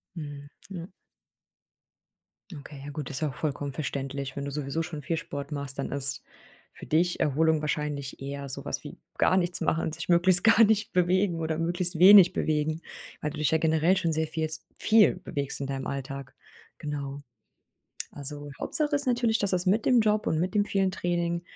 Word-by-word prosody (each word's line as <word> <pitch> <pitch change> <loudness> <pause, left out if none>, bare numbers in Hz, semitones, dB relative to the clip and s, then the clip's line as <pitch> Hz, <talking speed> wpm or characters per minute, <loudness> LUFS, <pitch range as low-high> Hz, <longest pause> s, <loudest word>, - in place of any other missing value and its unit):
Mhm. 145 -3 -8 0.2
Ja. 180 -3 -7 1.7
Okay, 145 -1 -10
ja 145 - -6
gut 145 -2 -6
ist 135 - -4
ja 155 - +1
auch 130 - -9
vollkommen 145 -2 -3
verständlich 140 -2 -4
wenn 140 - -3
du 140 - -4
sowieso 145 +2 -2
schon 160 -2 -6
viel 165 +4 -2
Sport 145 -1 -6
machst 140 -1 -4
dann 140 - -3
ist 140 -1 -2 0.5
für - - -12
dich 175 +3 +1
Erholung 160 +2 +2
wahrscheinlich 150 -3 -3
eher 140 0 -5
sowas 135 - -5
wie - - -9 0.2
gar 185 - +3
nichts 175 -1 +1
machen, 160 0 0
sich 160 +2 -6
möglichst 175 +1 +5
gar 225 0 +7
nicht 215 -1 +2
bewegen 180 0 +2
oder 160 -1 -1
möglichst 175 +1 -1
wenig 190 -1 +9
bewegen 155 +1 -1 0.4
weil 150 - -2
du 150 - -8
dich 150 -2 +1
ja 160 - +4
generell 160 +3 +2
schon 165 -3 0
sehr 160 0 0
vielst 155 0 -4
viel 220 -1 +5
bewegst 140 -6 -4
in 140 - -3
deinem 135 -1 -4
Alltag, 140 -1 -6 0.4
genau. 145 -1 -5 0.9
Also 145 0 -6
Hauptsache 300 -1 -1
ist 285 -1 0
natürlich, 240 -3 +2
dass 200 - +2
das 180 -1 0
mit 210 +4 +2
dem 250 -2 +5
Job 215 -1 +1
und 160 - +1
mit 185 +4 -2
dem 205 -1 +3
vielen 195 -2 +1
Training, 170 -1 -1
160 Hz, 185 wpm, -27 LUFS, 140-180 Hz, 1.7 s, wenig